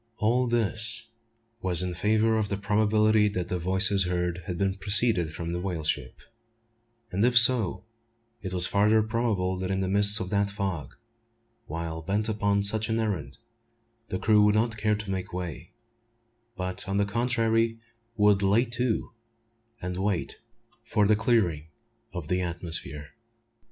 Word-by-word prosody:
All 120 +3 +1
this 115 0 +2 0.5
was 90 -1 +2
in 90 -1 -3
favour 110 +4 +1
of 105 -2 -2
the 100 - -2
probability 105 +1 +2
that 90 -3 -4
the 90 - -2
voices 95 +2 +3
heard 90 -1 -2
had 90 -3 -4 0.2
proceeded 100 -5 +4
from 85 +2 -6
the 85 - -3
whale 90 -4 -4
ship; 65 -5 -3 0.9
and 95 +3 -1
if 125 0 +3
so, 115 -6 +5 0.6
it 95 - -5
was 90 -1 +1
farther 105 +2 +2
probable 110 -5 -1
that 95 0 -4
in 95 0 -1
the 95 - -2
midst 100 +2 +4
of 95 - -5
that 100 -1 +1
fog, 95 -9 -5 0.7
while 80 +1 -5
bent 100 +6 -2
upon 100 -2 0
such 110 +2 +2
an 110 - 0
errand, 105 -9 -3 0.7
the 95 - -2
crew 105 +1 +3
would 105 0 +3
not 110 +1 +1
care 105 0 0
to 105 -1 -6
make 95 -1 -5
way; 90 -2 -6 0.8
but, 90 +2 -5
on 100 - -1
the 100 - +2
contrary, 115 0 0 0.4
would 105 -2 +3
"lay 100 +5 +2
to," 120 -1 -2 0.7
and 90 0 -4
wait 95 -2 -3 0.4
for 110 -3 0
the 105 +1 +3
clearing 105 -9 0 0.4
of 90 -5 -7
the 90 +2 -1
atmosphere. 80 -4 -5
100 Hz, 155 wpm, -26 LUFS, 90-110 Hz, 0.9 s, so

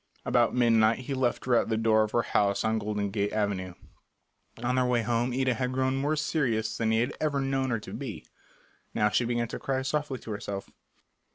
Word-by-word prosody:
About 120 -1 +2
midnight 115 -2 +4
he 135 +2 -4
left 130 -2 0
her 125 - +1
at - - +2
the 110 - +1
door 110 -1 +3
of 110 - +1
her 120 +2 +1
house 100 -1 +1
on 110 0 +1
Golden 105 -1 -2
Gate 105 0 -1
Avenue. 100 -4 -1 0.9
On 125 +1 +1
their 130 0 +2
way 120 -2 +2
home 120 +2 0
Ida 130 0 +1
had 125 +2 -2
grown 130 0 +1
more 145 +3 0
serious 120 -8 0
than 115 -1 0
he 110 0 +3
had 125 +4 -1
ever 150 -2 +1
known 135 -1 0
her 115 -2 0
to - - -9
be. - - -6 0.7
Now 105 - +3
she 120 - +1
began 120 0 0
to - - -5
cry 135 -1 -1
softly 145 -1 -2
to 115 - -9
herself. 100 -1 -5
120 Hz, 210 wpm, -28 LUFS, 110-130 Hz, 0.9 s, midnight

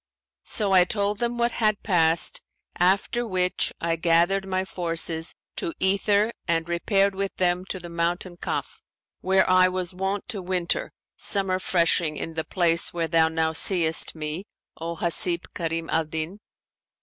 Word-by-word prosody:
So 205 -3 0
I 185 -1 +7
told 200 +2 -1
them 240 0 -1
what 235 0 +1
had 215 -3 0
passed, 165 -4 +3 0.3
after 200 +6 +1
which 185 -2 0
I 165 0 -1
gathered 175 +4 +2
my 185 0 -1
forces 165 -2 -1 0.2
to 335 -4 -3
"ether 200 +3 +2
and 165 -1 0
repaired 195 +3 +1
with 195 0 -3
them 180 0 0
to 190 - -4
the 175 - -9
mountain 175 +1 -2
Kaf, - - -4 0.4
where 190 0 +2
I 185 0 +5
was 185 0 -3
wont 190 +2 -3
to 210 -6 -4
winter, 180 -1 -1 0.3
summer 195 -2 +1
freshing 170 -4 +1
in 165 - -5
the 160 0 -2
place 170 -2 0
where 170 -1 -2
thou 165 -1 +3
now 160 0 0
seest 165 -1 +2
me, 155 +5 -5 0.3
O 165 +1 -5
Hasib 170 +1 0
Karim 165 -1 -3
al 160 0 +1
Din. 160 +5 -5
180 Hz, 155 wpm, -25 LUFS, 165-195 Hz, 0.4 s, I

